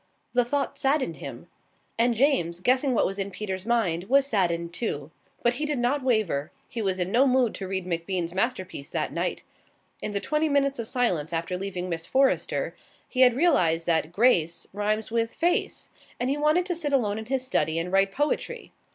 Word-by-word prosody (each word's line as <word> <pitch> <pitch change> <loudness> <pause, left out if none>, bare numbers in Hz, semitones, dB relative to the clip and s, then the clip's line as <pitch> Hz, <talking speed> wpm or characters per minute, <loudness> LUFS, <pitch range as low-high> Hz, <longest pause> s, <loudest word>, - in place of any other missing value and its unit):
The 245 0 +4
thought 275 +3 -2
saddened 270 - +1
him. 135 +3 -8 0.5
And 235 +1 +2
James, 225 - +2
guessing 255 +5 +2
what - - +3
was 195 +1 -3
in 195 0 -2
Peter's 190 -1 -5
mind, 190 -8 +1
was 275 +5 +4
saddened 170 -8 0
too. 160 - -3 0.3
But 240 - +3
he - - +1
did 300 -2 -1
not 250 +4 +1
waver. 215 - 0 0.2
He 230 - -5
was 190 -3 0
in 180 +1 -1
no 255 +5 +4
mood 255 -3 +3
to 190 - -6
read 190 -1 -2
MacBean's 175 0 -2
masterpiece 185 - -2
that - - -2
night. - - -2 0.6
In - - -2
the 200 - -1
twenty 305 +7 0
minutes 275 -2 +1
of 230 - -3
silence 180 - 0
after 165 +2 -2
leaving 185 -1 -4
Miss 165 -2 -4
Forrester 270 0 +1 0.3
he 255 - -1
had 250 -2 +7
realized 170 - +3
that 160 -1 +1
"Grace" 175 -6 +2
rhymes 210 +2 -1
with 230 0 -1
"face", 345 +1 0 0.3
and 250 +2 0
he - - +1
wanted 305 +4 +2
to 360 -2 -1
sit 300 -4 -3
alone 215 -6 +1
in 220 - -7
his 260 +2 -1
study 165 -11 0
and 170 +2 -2
write 195 0 +3
poetry. 300 - -2
220 Hz, 195 wpm, -26 LUFS, 180-260 Hz, 0.6 s, had